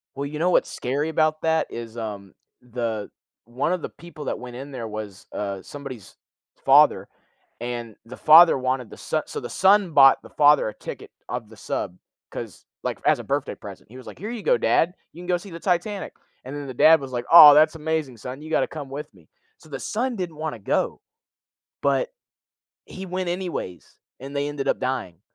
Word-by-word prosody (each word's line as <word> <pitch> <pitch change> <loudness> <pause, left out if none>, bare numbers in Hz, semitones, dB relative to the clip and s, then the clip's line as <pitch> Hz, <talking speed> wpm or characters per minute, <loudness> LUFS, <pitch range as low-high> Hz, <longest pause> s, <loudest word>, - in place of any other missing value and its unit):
Well, 140 +1 -3
you 150 +1 -6
know 175 +3 +2
what's - - +2
scary 140 +5 -2
about 155 -1 +1
that? 160 0 +1
Is, 115 -1 -8
um, 105 -4 -6 0.3
the 115 -4 -4 0.3
one 125 - -2
of 180 - -2
the - - -4
people 165 -3 -11
that - - -2
went 125 -1 -9
in 135 +3 -8
there 125 -4 -6
was, 105 -3 -8
uh, 100 -2 -4
somebody's 135 -7 -10 0.5
father - - +5 0.5
and 120 -2 -5
the 125 +2 -10
father 165 +3 +8
wanted 130 -2 -2
the - - -11
so - - -2
so, - - -6
the - - -7
son 195 -2 +4
bought 135 -2 +6
the - - -14
father 145 -5 +4
a 105 - -7
ticket - - -9 0.2
of 120 -2 -5
the 110 - -15
sub 90 -2 -4 0.3
'cause - - -8 0.2
like, - - -2
as - - +4
a - - -7
birthday - - -2
present, - - -12
he 120 - -14
was 130 - -12
like, - - -10
"Here 210 +5 -6
you 240 - -6
go - - +3
dad 175 +2 +2 0.2
you 170 - -12
can 180 - -9
go 180 0 +2
see 195 +3 -9
the 165 0 -9
Titanic," 190 +2 -1 0.3
and 130 +3 -7
then 145 -1 -6
the 130 - -7
dad 160 +5 +6
was 135 -1 -8
like, 120 -1 -3
"Aw 150 -3 +11
that's 155 +2 +5
amazing 155 -4 -2
son, 125 +5 -8
you 155 - -9
gotta 160 - +2
come 145 -4 -8
with 145 +2 -7
me," 85 -5 -22 0.3
so - - -18
the 140 -3 -6
son 245 +3 -2
didn't 175 -5 -5
wanna 155 +1 -4
go, - - -1 0.8
but - - +1 0.7
he 190 - -8
went 185 -1 -3
anyways, 175 - -5 0.2
and 135 +2 -9
they 140 0 -1
ended 145 -2 -4
up - - +1
dying. 110 -10 -3
145 Hz, 210 wpm, -24 LUFS, 120-165 Hz, 0.8 s, Aw